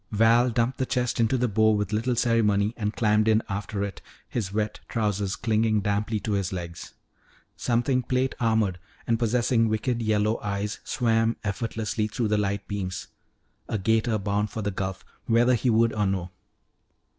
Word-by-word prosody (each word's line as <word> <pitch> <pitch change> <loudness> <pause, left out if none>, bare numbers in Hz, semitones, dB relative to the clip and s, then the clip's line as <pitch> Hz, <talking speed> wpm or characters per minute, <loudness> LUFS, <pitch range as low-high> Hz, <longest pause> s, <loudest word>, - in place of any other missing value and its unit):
Val 115 +3 +4
dumped 120 +2 0
the 130 - +1
chest 125 -2 -1
into 115 +3 +2
the 125 0 +1
bow 110 0 +3
with 105 -1 0
little 120 +3 0
ceremony 110 -3 +2
and 105 -2 -3
climbed 105 -1 +2
in 110 0 +4
after 100 +1 -3
it, 100 -3 -5 0.3
his 105 -6 -3
wet 105 +1 -2
trousers 105 -2 -1
clinging 110 -1 +1
damply 105 +2 -1
to 105 - -4
his 100 -2 0
legs. 85 -2 -6 0.6
Something 125 +2 +1
plate 130 +2 0
armored 110 -6 +1 0.3
and 115 -1 +1
possessing 115 0 +2
wicked 115 +2 -1
yellow 110 0 +1
eyes 105 0 -3
swam 115 -1 +1
effortlessly 110 0 -2
through 110 0 -2
the 105 - +2
light 100 0 -2
beam 100 -3 -3 0.8
a 110 - 0
'gator 110 +3 +1
bound 105 +1 -1
for 110 - -5
the 105 - -1
Gulf, 95 0 -4 0.2
whether 120 +2 +4
he 125 +1 +1
would 115 0 +3
or 105 -2 +1
no. 95 -2 -2
110 Hz, 170 wpm, -26 LUFS, 105-115 Hz, 0.8 s, Val